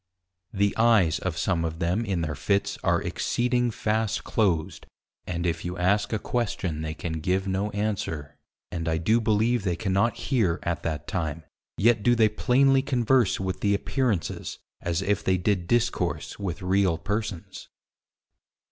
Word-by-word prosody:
The 100 0 +1
eyes 110 -8 +4
of - - -3
some 85 -3 0
of 80 -1 -3
them 90 +8 0
in 95 -5 -1
their 75 -2 -2
fits 100 +6 0
are - - +2
exceeding 125 0 0
fast 110 -1 -1
closed, 90 -8 0 0.4
and 85 -1 -2
if 85 -1 -1
you 90 +1 -4
ask 100 +3 +1
a 110 - +1
question 100 -8 -2
they 80 0 -4
can 80 -2 -4
give 95 +4 0
no 95 +2 -1
answer, 95 -8 -3 0.4
and 85 -2 -4
I 80 - +1
do 110 +8 +2
believe 110 +2 +2
they 90 -3 0
cannot 95 +5 +1
hear 105 - +1
at 85 0 -2
that 75 -3 -4
time, 80 -3 -3 0.3
yet 115 +1 +4
do 120 +3 +4
they 110 -2 +4
plainely 135 +5 +3
converse 130 -4 +2
with 95 -1 -3
the 100 -1 +2
Appearances, 110 - -2 0.2
as 85 +2 -1
if 100 +1 0
they 95 -1 +2
did 90 -1 0
discourse 120 -1 0
with 95 -2 -4
real 95 -2 +2
persons. 100 0 -4
100 Hz, 160 wpm, -26 LUFS, 85-110 Hz, 0.4 s, eyes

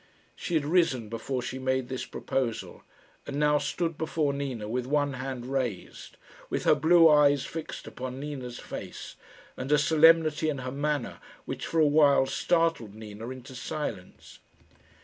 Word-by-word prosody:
She 175 - -3
had 150 -3 +1
risen 145 -9 +2
before 120 +3 -3
she 125 +2 -5
made 130 -1 0
this 130 0 -4
proposal, 125 -4 -3 0.5
and 140 - -4
now 150 0 +3
stood 165 -1 -2
before 155 -2 0
Nina 130 -6 -4
with 125 +3 -2
one 145 0 +1
hand 130 -1 -5
raised, 125 -8 -4 0.3
with - - -2
her - - +5
blue 165 +1 +6
eyes 145 -3 +5
fixed 160 -1 -7
upon 130 +1 -6
Nina's 135 -4 -6
face, - - -8 0.4
and 130 +2 -5
a 150 - +6
solemnity 160 +1 +4
in 145 - -2
her 130 0 -5
manner 145 -2 -2 0.3
which - - -5
for 165 - 0
a 155 - +6
while 145 -2 +5
startled 165 - 0
Nina 110 +1 -8
into 130 +1 -9
silence. 120 -7 -6
140 Hz, 155 wpm, -28 LUFS, 125-150 Hz, 0.5 s, blue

